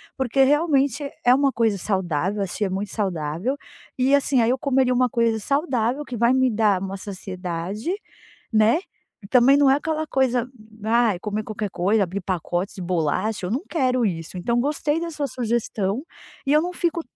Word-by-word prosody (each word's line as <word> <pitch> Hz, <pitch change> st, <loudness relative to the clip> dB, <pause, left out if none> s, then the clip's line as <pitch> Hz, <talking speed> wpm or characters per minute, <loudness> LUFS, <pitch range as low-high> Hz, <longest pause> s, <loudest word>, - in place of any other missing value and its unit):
porque 265 Hz, 0 st, +2 dB
realmente 285 Hz, -1 st, +2 dB, 0.2 s
é 245 Hz, -, +7 dB
uma 275 Hz, 0 st, +3 dB
coisa 225 Hz, -5 st, +1 dB
saudável, 190 Hz, 0 st, -1 dB
assim, 195 Hz, +3 st, -3 dB
é -, -, -2 dB
muito 195 Hz, +2 st, -3 dB
saudável. 185 Hz, -, -2 dB, 0.4 s
E, 265 Hz, +2 st, +2 dB
assim, 275 Hz, -3 st, +2 dB
aí 225 Hz, -, +2 dB
eu 260 Hz, -, +1 dB
comeria 260 Hz, -2 st, +2 dB
uma 250 Hz, 0 st, +2 dB
coisa 230 Hz, -1 st, +1 dB
saudável 270 Hz, 0 st, 0 dB
que 250 Hz, -, -6 dB
vai 235 Hz, +2 st, +3 dB
me 260 Hz, -1 st, +3 dB
dar 210 Hz, -3 st, +2 dB
uma 195 Hz, 0 st, -4 dB
saciedade, 190 Hz, -, -5 dB, 0.6 s
né, 220 Hz, +9 st, +4 dB, 0.5 s
também 260 Hz, +3 st, +6 dB
não 280 Hz, -2 st, +5 dB
é 275 Hz, -, +5 dB
aquela 315 Hz, +1 st, -2 dB
coisa, 250 Hz, -3 st, +1 dB, 0.4 s
ai, 225 Hz, -4 st, +2 dB
comer 210 Hz, 0 st, -3 dB
qualquer 215 Hz, -2 st, -4 dB
coisa, 200 Hz, +5 st, +1 dB
abrir 190 Hz, +2 st, -2 dB
pacotes 180 Hz, +1 st, -2 dB
de 185 Hz, -, -7 dB
bolacha, 180 Hz, +4 st, -1 dB
eu -, -, -4 dB
não 270 Hz, +7 st, -1 dB
quero 255 Hz, -6 st, +1 dB
isso. 170 Hz, -2 st, -3 dB
Então 235 Hz, +7 st, 0 dB
gostei 295 Hz, +2 st, 0 dB
da 335 Hz, 0 st, -3 dB
sua 290 Hz, -2 st, -2 dB
sugestão. 230 Hz, -2 st, -1 dB, 0.4 s
E 280 Hz, -, +2 dB
eu 305 Hz, -, +5 dB
não 360 Hz, -, -3 dB
fico 335 Hz, -1 st, -1 dB
230 Hz, 180 wpm, -23 LUFS, 195-270 Hz, 0.6 s, é